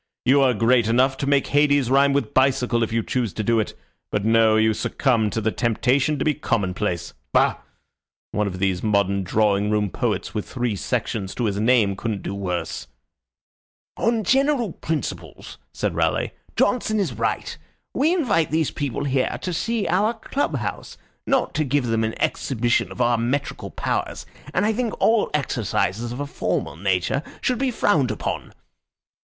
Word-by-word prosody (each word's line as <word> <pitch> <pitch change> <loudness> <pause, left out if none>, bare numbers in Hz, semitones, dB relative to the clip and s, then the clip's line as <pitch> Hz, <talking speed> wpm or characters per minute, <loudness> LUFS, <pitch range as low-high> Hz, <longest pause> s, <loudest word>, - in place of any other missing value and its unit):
You 135 +3 +5
are 130 -3 +3
great 115 +1 +3
enough 130 +4 +3
to 140 - -3
make 140 -1 +3
Hades 145 -3 +2
rhyme 140 +1 +5
with 140 -6 -1
bicycle 130 -3 +2
if 115 - 0
you 115 0 0
choose 120 -6 -2
to 110 - -3
do 115 +2 +2
it 110 - -2 0.4
but 105 0 -1
no, 115 -1 +4
you 110 0 +3
succumb 115 -1 +1
to 110 - -2
the 110 0 0
temptation 130 +6 +1
to - - -2
be 155 - +3
commonplace. 95 - -2 0.2
Bah! - - +3 0.7
One 105 -1 0
of 95 -2 -4
these 95 -1 0
modern 100 -2 +1
drawing 105 +1 +1
room 105 -2 0
poets - - -2
with 105 - -4
three 120 -4 -1
sections 95 0 -3
to 120 - -1
his 100 -2 -1
name 110 -3 +3
couldn't 105 -1 -4
do - - -4
worse." 90 -10 -4 1.1
"On 230 -1 +1
general 265 - +2
principles," 160 0 -5
said - - -2
Raleigh, - - 0 0.2
"Johnson 220 -3 +1
is 175 -11 -1
right. 115 +1 -2 0.4
We 295 +6 +2
invite 230 - +1
these 155 -1 0
people 140 -2 -3
here 135 -2 0
to 180 - -2
see 225 +3 -1
our 205 +7 +2
club 270 +5 -2
house, - - -5 0.3
not 270 -2 +1
to 155 - +1
give 140 -1 0
them 115 -1 0
an 110 0 -3
exhibition 120 -2 0
of - - -5
our 120 -1 +3
metrical 130 +5 -2
powers, - - -3 0.3
and - - +1
I 220 - +2
think 230 -1 -2
all 225 -1 +3
exercises 115 -5 -1
of 120 - -6
a 145 - -2
formal 140 - -2
nature 95 - 0 0.2
should 250 -2 0
be 270 -1 +1
frowned 205 - +2
upon." - - -4
125 Hz, 170 wpm, -23 LUFS, 105-150 Hz, 1.1 s, You